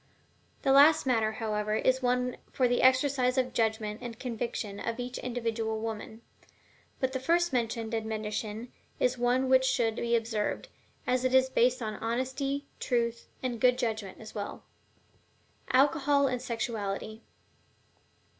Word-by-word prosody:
The 270 - +3
last 285 +3 +7
matter, 225 -4 +2
however, 215 -1 -1
is 260 +3 +2
one 250 0 0
for 255 - +2
the 245 0 +1
exercise 260 0 +3
of 260 - +4
the 250 - -11
judgment 220 -1 -1
and 235 -2 -7
conviction 230 -4 -4
of 230 +1 -3
each 245 +1 -4
individual 230 -2 -2
woman; 220 0 -6 0.8
but 260 0 0
the 260 - -1
first 340 +4 +2
mentioned 230 -2 -1
admonition 220 +1 -3 0.3
is 250 0 +1
one 250 +2 +2
which 260 0 +5
should 235 -3 +1
be 235 0 +1
observed, 220 -2 -2 0.4
as 250 0 +1
it 255 0 +2
is 260 0 +5
based 250 0 +2
on 215 -1 -4
honesty, 265 +4 -2
truth, 235 -2 -1 0.2
and 245 -3 -3
good 250 -1 +5
judgment 220 -6 -3
as 220 - -10
well. 205 -2 -6 1.1
ALCOHOL 280 +1 +4
AND 250 -2 -1
SEXUALITY. 220 -2 -3
240 Hz, 145 wpm, -29 LUFS, 220-255 Hz, 1.1 s, last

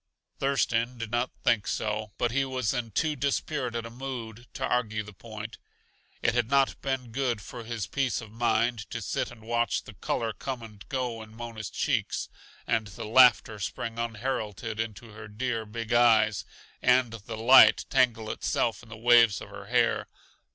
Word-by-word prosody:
Thurston 125 -3 +1
did 115 -2 -5
not 120 +2 +1
think 115 -4 +2
so, 105 0 -2
but 120 -1 +1
he 135 +3 +2
was 130 -4 -1
in 120 -3 -2
too 150 +8 0
dispirited 130 -3 -1
a 115 - -8
mood 120 -2 -7
to - - -1
argue 110 -3 0
the 105 0 -11
point. 110 +2 -8 0.6
It 115 - +3
had 120 -2 +1
not 140 -1 +2
been 130 -3 -2
good 125 -2 0
for 120 +3 -8
his 115 -4 -3
peace 135 +6 -1
of 115 -3 -10
mind 115 -2 0
to 115 - -4
sit 105 - -2
and 120 -2 -13
watch 120 -1 0
the - - -11
color 115 -1 -2
come 125 +4 -5
and 105 -3 -11
go 125 -4 -2
in 110 0 -12
Mona's 115 -3 -6
cheeks, - - -1 0.4
and 110 -2 0
the 100 - -7
laughter 115 -2 +5
spring 115 +4 -4
unheralded 115 -2 -3
into 115 0 -5
her 105 0 -10
dear, 115 +1 -3
big 115 +1 -4
eyes, 110 -4 +4 0.4
and 125 -2 +4
the 110 0 -7
light 130 +4 +7
tangle 115 -5 +2
itself 115 0 -1
in 115 - -16
the 115 - -9
waves 115 -3 +5
of - - -10
her - - -10
hair. - - +2
115 Hz, 175 wpm, -28 LUFS, 110-125 Hz, 0.6 s, light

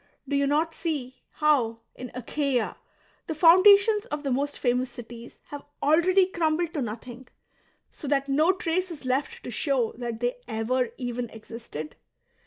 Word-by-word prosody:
Do 280 - -1
you 280 0 +2
not 315 +3 +1
see 275 -6 -4
how', 250 -7 +2
in 250 0 -8
Achaia, 255 0 -1 0.5
the 320 - -3
foundations 400 +6 +6
of 295 -10 -5
the 275 - -1
most 280 +3 -1
famous 250 0 0
cities 240 -1 -11
have 290 -1 -7 0.2
already 350 +6 +4
crumbled 335 -2 -1
to 295 - -2
nothing, 240 +2 -7 0.6
so 295 - -9
that 275 0 +1
no 305 +6 +4
trace 370 0 -1
is 310 -6 -9
left 260 +3 -1
to - - -6
show 255 -2 0
that 235 -2 -4
they 245 +1 -1
ever 235 +2 0
even 245 -1 -4
existed 220 -9 -9
275 Hz, 155 wpm, -26 LUFS, 245-320 Hz, 0.6 s, foundations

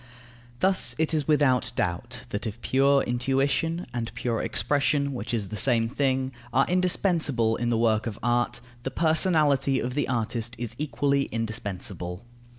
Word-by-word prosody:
Thus 190 0 +3
it 160 +1 0
is 150 -3 0
without 145 -5 +3
doubt 120 +9 -2
that 115 0 -3
if 110 +2 -6
pure 140 +1 +3
intuition 135 +7 0
(and 120 -2 -3
pure 115 -2 -1
expression, 140 -1 0
which 125 - -5
is 110 -5 -2
the 110 - -5
same 115 +1 +3
thing) 130 +1 0 0.2
are 135 - +3
indispensable 170 - +2
in 120 -1 -1
the 115 - +1
work 110 -1 +2
of 110 -2 -5
art, 120 0 +1 0.2
the 130 - -3
personality 150 -3 +2
of 125 +1 -3
the 145 +1 0
artist 115 -1 -2
is 115 -1 -5
equally 140 0 +1
indispensable. 100 -4 -4
125 Hz, 155 wpm, -26 LUFS, 115-140 Hz, 0.2 s, Thus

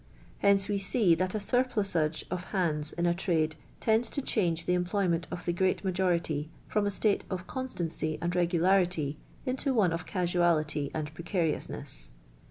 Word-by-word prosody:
Hence 200 -1 +4
we 205 -1 0
see 195 -2 +3
that 185 +4 0
a - - 0
surplusage 200 -9 0
of 180 0 -3
hands 155 -6 0
in 175 - -1
a 170 - +3
trade 160 -3 0 0.2
tends 225 +1 +2
to 280 - -2
change 170 -9 +1
the 180 - +2
employment 180 -2 0
of 175 - -6
the 175 - +1
great 185 +3 +1
majority 175 -5 0 0.2
from 210 -1 +1
a - - +2
state 205 +1 +1
of 180 -2 -4
constancy 175 -12 -3
and 175 +1 -2
regularity 175 -3 +2 0.3
into 265 +1 0
one 190 -7 +3
of 165 +1 -4
casualty 170 -5 +1
and 155 -1 -3
precariousness. 165 - -2
180 Hz, 160 wpm, -30 LUFS, 165-200 Hz, 0.3 s, Hence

